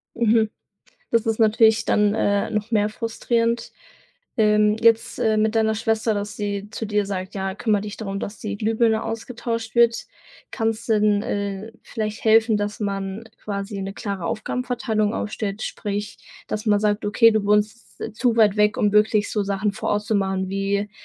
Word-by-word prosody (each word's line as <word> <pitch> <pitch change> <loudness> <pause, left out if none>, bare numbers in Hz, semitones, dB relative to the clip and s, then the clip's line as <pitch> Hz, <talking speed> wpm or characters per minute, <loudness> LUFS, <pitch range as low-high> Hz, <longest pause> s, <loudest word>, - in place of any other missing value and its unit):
Mhm. 225 -1 +3 0.6
Das 230 0 +2
ist 225 -1 0
natürlich 220 0 +4
dann, 210 0 +2
äh, 205 -1 +1
noch 215 0 -2
mehr 210 -2 +2
frustrierend, 230 +1 -1 0.7
ähm, 210 -1 +4
jetzt, 225 -1 +3
äh, 220 -1 +2
mit 215 +1 +1
deiner 220 -1 +2
Schwester, 220 0 0
dass 205 +1 -4
sie 205 -1 -3
zu 225 - -5
dir 210 -1 0
sagt: 190 -1 -5
„Ja, 190 -1 -3
kümmere 210 0 +1
dich 210 -1 -6
darum, 195 -2 -4
dass 205 - -6
die 205 -1 -4
Glühbirne 220 +1 +1
ausgetauscht 230 -1 -4
wird.“ 235 -1 +3 0.5
Kann's 225 -2 -2
denn, 210 -2 +3
äh, 200 +2 -4
vielleicht 215 -1 -4
helfen, 225 0 +5
dass 205 +2 -3
man 195 +1 -3 0.2
quasi 200 0 -4
'ne 195 0 -5
klare 200 -6 -4
Aufgabenverteilung 230 0 -1
aufstellt? 210 -1 -3
Sprich, 205 0 -4 0.3
dass 215 +1 -4
man 205 -1 +3
sagt: 210 0 0
„Okay, 230 +2 +5
du 215 -2 0
wohnst, 210 +3 0
äh, 225 - -5
zu 230 +2 +1
weit 215 -3 +4
weg, 210 0 +3
um 205 -1 +2
wirklich 210 0 +3
so 210 - 0
Sachen 200 +1 -1
vor 200 - -4
Ort 205 0 +1
zu 220 0 -1
machen, 190 -1 0
wie 200 +1 -1
215 Hz, 175 wpm, -23 LUFS, 205-225 Hz, 0.7 s, helfen